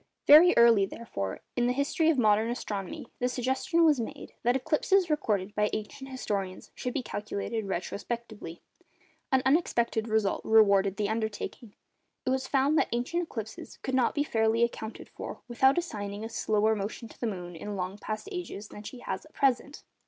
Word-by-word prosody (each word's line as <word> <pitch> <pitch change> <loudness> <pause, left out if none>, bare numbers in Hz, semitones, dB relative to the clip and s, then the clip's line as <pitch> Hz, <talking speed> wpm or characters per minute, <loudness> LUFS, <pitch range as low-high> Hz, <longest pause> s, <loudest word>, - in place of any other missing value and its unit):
Very 320 +5 +8
early, 230 -4 +6
therefore, 100 - -5
in 245 -1 +2
the 250 - +2
history 280 +4 +1
of 320 - +3
modern 215 -1 +3
astronomy, 205 -5 -4
the 250 - +1
suggestion 265 +8 +1
was 300 -5 +4
made, 230 - -6
that 245 +2 +2
eclipses 335 +7 +2
recorded 210 -9 0
by 210 0 +1
ancient 240 +6 -5
historians 200 -8 -4
should 250 - -4
be 270 - -1
calculated 215 0 -4
retrospectively. 200 0 -5 0.7
An 260 -1 +3
unexpected 235 -6 +2
result 220 -3 +1
rewarded 200 -3 +4
the 210 -2 0
undertaking. 220 0 -4 0.5
It 255 - +1
was 260 0 0
found 280 +3 +3
that - - +1
ancient 245 +9 -1
eclipses 225 -10 -7
could 260 - -3
not 260 -2 +2
be 290 - +2
fairly 225 -3 +2
accounted 230 -1 -3
for - - -8
without 265 +4 +3
assigning 205 - -3
a - - -5
slower 220 -1 +1
motion 210 +3 -5
to - - -17
the 240 - -1
moon 180 -4 -5
in 205 +5 -5
long 190 +2 -4
past 215 - -5
ages 350 - -6
than 205 - -9
she 245 +4 -9
has - - -4
at 310 - -26
present! 275 +1 0
230 Hz, 175 wpm, -29 LUFS, 210-265 Hz, 0.7 s, Very